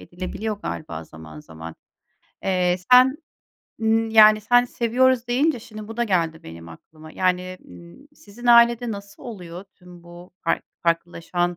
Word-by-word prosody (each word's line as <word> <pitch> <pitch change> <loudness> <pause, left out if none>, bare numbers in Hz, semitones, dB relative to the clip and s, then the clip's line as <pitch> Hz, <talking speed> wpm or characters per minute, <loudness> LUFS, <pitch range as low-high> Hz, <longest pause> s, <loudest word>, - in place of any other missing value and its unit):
edilebiliyor 200 +5 -6
galiba 80 -1 -6
zaman 80 -1 -13
zaman. 80 +1 -11 0.7
Eee, 180 -2 +1 0.2
sen, 255 +2 +6 0.6
ımm, 225 0 +1
yani, 215 -1 +7
sen 245 +3 +3
seviyoruz 245 +1 +1
deyince 265 +1 +1
şimdi 215 -1 -11
bu 225 - -9
da 240 - 0
geldi 165 -6 -1
benim 85 0 -11
aklıma. 155 - -15
Yani, 185 0 -1
ımm, 175 +12 -15
sizin 240 -1 -12
ailede 235 0 +5
nasıl 200 -1 -9
oluyor 180 -6 -9
tüm 180 -1 -16
bu 175 +1 -14
fark 165 - 0 0.2
farklılaşan 175 +1 -2
185 Hz, 140 wpm, -22 LUFS, 170-230 Hz, 0.7 s, yani